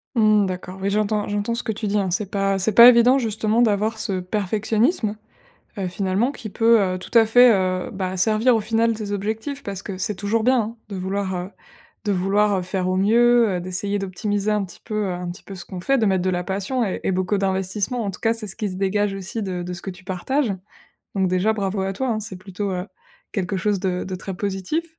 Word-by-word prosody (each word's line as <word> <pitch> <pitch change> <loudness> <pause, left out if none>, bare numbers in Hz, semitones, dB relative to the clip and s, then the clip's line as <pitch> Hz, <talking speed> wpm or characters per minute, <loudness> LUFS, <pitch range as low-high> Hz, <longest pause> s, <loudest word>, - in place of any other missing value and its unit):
Mmh 215 -2 +4
d'accord, 185 0 -5
oui 200 - 0
j'entends 210 0 0
j'entends 205 +3 -1
ce 240 - -2
que 220 - -1
tu 210 0 -4
dis, 205 - +1
hein. 195 -3 0
C'est 195 +2 -1
pas 195 -1 0
c'est 210 +3 +1
pas 235 +3 +10
évident 250 +2 +5
justement 220 -1 0
d'avoir 215 0 +1
ce 195 -4 -1
perfectionnisme, 215 - 0 0.6
heu, 190 -2 -2
finalement 195 +8 0
qui 215 - -7
peut, 225 +1 +4
heu, 185 -1 -1
tout 230 - 0
à 225 - +7
fait, 245 +3 +7
heu, 185 +1 -1
bah, 190 -1 -3
servir 220 +5 +3
au 225 - +3
final 225 +1 +1
tes 210 -2 -5
objectifs 220 +8 -3
parce 195 -1 -5
que 195 -2 -6
c'est 200 +2 -2
toujours 210 +3 0
bien, 255 0 +4
hein, 225 +2 -5
de 200 - -5
vouloir, 190 +1 -2
heu, 180 +2 -4 0.5
de 210 - 0
vouloir, 200 +2 +2
heu, - - -1
faire 185 0 -2
au 185 - 0
mieux, 235 +4 +4
heu, 180 - -1
d'essayer 190 +3 -2
d'optimiser 205 +2 -2
un 210 -2 +1
petit 175 -1 -13
peu, 215 -2 -2
heu, 185 - -2
un 175 0 -4
petit 180 - -11
peu 195 - -9
ce 175 - -7
qu'on 185 - -8
fait, 270 +9 +1
de 225 - +2
mettre 190 -2 +2
de 185 - +2
la 180 -1 -1
passion 200 +7 -1
et 190 - -3
et - - +2
beaucoup 185 +2 0
d'investissement. 195 +4 -1
En 200 - -2
tout - - -9
cas, 225 0 +2
c'est 225 -2 -4
ce 195 - -5
qui 210 -3 -2
se 185 - -6
dégage 195 +1 0
aussi 195 +3 -5
de 180 -3 -3
de 180 0 -5
ce 175 - -7
que 195 - -5
tu 180 +1 -14
partages. 205 +7 -1 0.6
Donc 190 -1 +2
déjà, 185 +4 +2
bravo 195 -2 -2
à 190 0 -1
toi, 260 +5 -2
hein. 215 -1 -1
C'est 205 -3 -7
plutôt, 190 +1 -5
heu, 180 0 -3 0.5
quelque 195 0 -2
chose 200 0 0
de 180 -1 -1
de 185 - -5
très 190 +1 -6
positif 200 - -2
200 Hz, 245 wpm, -22 LUFS, 185-220 Hz, 0.6 s, pas